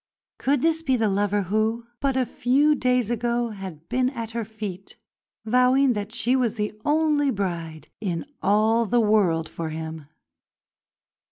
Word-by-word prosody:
Could 275 -1 +1
this 325 0 +2
be 265 -5 +1
the 220 -2 +1
lover 205 +1 +1
who, 220 +4 0
but 275 -2 0
a 260 - +2
few 275 +6 +2
days 250 -4 +1
ago, 240 0 0
had 190 -6 -9
been 255 +1 +1
at 230 -4 -6
her 230 0 -2
feet, 205 -3 -8 0.5
vowing 250 +3 +4
that 205 -1 -4
she 240 +2 +1
was 240 -4 +1
the 210 -1 -2
only 295 -1 +2
bride 170 -7 -4
in 185 -2 -3 0.2
all 220 +3 +3
the 240 +3 +2
world 200 -7 +2
for 165 0 -5
him? 160 -1 -6
225 Hz, 155 wpm, -24 LUFS, 200-250 Hz, 0.5 s, vowing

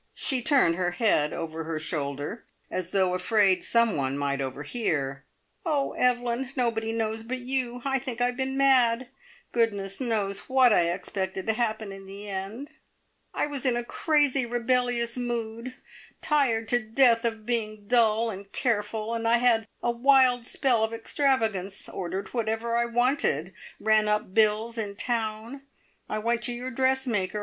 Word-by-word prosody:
She 260 -3 +1
turned 265 - +3
her 180 -1 +1
head 175 -8 +2
over 165 -1 -5
her 160 -1 -3
shoulder, 145 - -4 0.3
as 185 -2 -3
though 185 -1 +1
afraid 190 +1 +2
some 230 -2 +2
one 135 -1 -1
might 140 -1 -1
overhear. 140 - -3 0.4
"Oh, 300 -6 0
Evelyn, 245 0 +1
nobody 230 -3 0
knows 225 -1 -2
but 245 +3 -4
you. 250 -1 -3
I 270 -1 +1
think 250 -2 -5
I 245 - +3
have 245 0 -1
been 265 0 -2
mad. 255 -3 +3 0.4
Goodness 205 -3 -1
knows 205 -5 -2
what 260 -3 +5
I 170 -3 +3
expected 190 +1 -3
to 220 - +1
happen 220 -3 -2
in 195 0 -10
the 200 +2 -9
end. 200 +8 -5 0.6
I - - 0
was 285 -3 -5
in 250 -3 +2
a 240 - -2
crazy, 290 0 +1
rebellious 240 0 0
mood, 235 0 -4 0.4
tired 245 -7 +2
to 245 - +3
death 230 +1 +3
of 225 -2 -2
being 215 -3 -2
dull 230 -1 +3
and 195 0 -10
careful, 220 -2 -1
and 230 0 -2
I 235 +1 +5
had 235 -2 +2 0.2
a 240 - +2
wild 250 -1 +4
spell 245 -5 +1
of 220 +1 -1
extravagance, 225 - -1
ordered 190 +2 -5
whatever 230 0 -1
I 235 0 +2
wanted, 235 - 0 0.3
ran 215 -1 +3
up 210 -2 -1
bills 220 +2 +2
in 205 -2 -3
town. 225 +3 -3 0.5
I 215 - -2
went 230 +2 0
to 245 - 0
your 250 +2 -5
dressmaker. 255 -6 0
230 Hz, 160 wpm, -27 LUFS, 200-245 Hz, 0.6 s, what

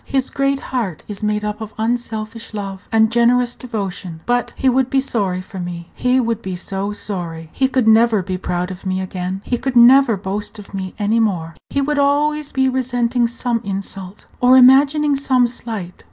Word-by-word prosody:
His 265 -1 -1
great 275 0 0
heart 210 -11 -2
is 205 0 -7
made 210 0 -1
up 210 +1 -4
of 220 -1 -7
unselfish 225 -1 -3
love 195 -1 -6
and 220 0 +4
generous 240 +1 +3
devotion. 195 -8 -5
But 245 0 0
he 265 - -1
would 260 0 +3
be 270 - +2
sorry 200 -9 -1
for 190 +1 -9
me; 175 -1 -6
he 250 +1 +1
would 230 -3 -1
be 190 -3 -4
so 195 +3 -4
sorry! 170 -6 -5
He 265 - +2
could 260 -3 0
never 220 -2 +5
be 185 0 -4
proud 180 +1 -2
of 185 0 -9
me 185 -1 -1
again; 185 0 -4
he 245 - -1
could 265 -2 -3
never 240 -1 +7
boast 205 +2 -4
of 205 -1 -12
me 190 -1 -5
any 215 +2 +1
more. 175 -7 0 0.2
He 280 - 0
would 295 +1 -1
be - - +4
always 295 +1 +1
resenting 250 -2 +1
some 235 -1 -2
insult, 195 0 -6
or 250 +1 +6
imagining 280 +3 +5
some 260 -2 +2
slight. 225 -6 -5
225 Hz, 190 wpm, -19 LUFS, 195-255 Hz, 0.2 s, never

